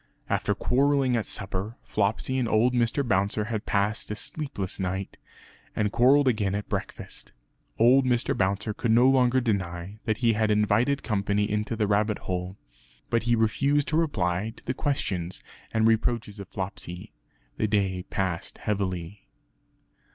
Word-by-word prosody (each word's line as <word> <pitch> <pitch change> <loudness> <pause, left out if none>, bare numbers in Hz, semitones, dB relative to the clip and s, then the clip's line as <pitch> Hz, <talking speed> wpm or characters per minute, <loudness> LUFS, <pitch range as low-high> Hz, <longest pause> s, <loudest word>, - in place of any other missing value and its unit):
After - - +1
quarrelling 135 -1 +2
at 115 - -1
supper, 100 +3 -3
Flopsy 110 +5 0
and 125 - 0
old 120 +3 +3
Mr. 120 +3 +1
Bouncer 100 0 +1
had 110 0 -4
passed 100 +2 0
a 105 - -2
sleepless 110 -7 -4
night, 95 +1 -3 0.6
and 105 -2 0
quarrelled 135 +4 +5
again 105 -5 +1
at 105 - -4
breakfast. - - -6 0.4
Old 125 +4 +6
Mr. 125 -2 +1
Bouncer 100 +3 0
could 115 +2 -2
no 120 +3 +6
longer 130 -1 +4
deny 95 -4 -3
that 110 -2 0
he 115 -2 +3
had 110 0 +1
invited 105 +6 +2
company 105 -1 0
into 105 +2 -2
the 110 -1 +1
rabbit 105 +1 +1
hole; 90 +1 -4 0.5
but 115 - +2
he 120 - +5
refused 140 +6 +2
to 155 - -1
reply 105 - 0
to - - -17
the 130 - -1
questions 95 - -2 0.3
and 110 0 +2
reproaches 110 -2 0
of 100 - -7
Flopsy. 90 -3 -6 0.4
The 110 - +1
day 100 -3 0
passed 95 -4 -3
heavily. 95 -2 -3
105 Hz, 150 wpm, -26 LUFS, 100-120 Hz, 0.6 s, Old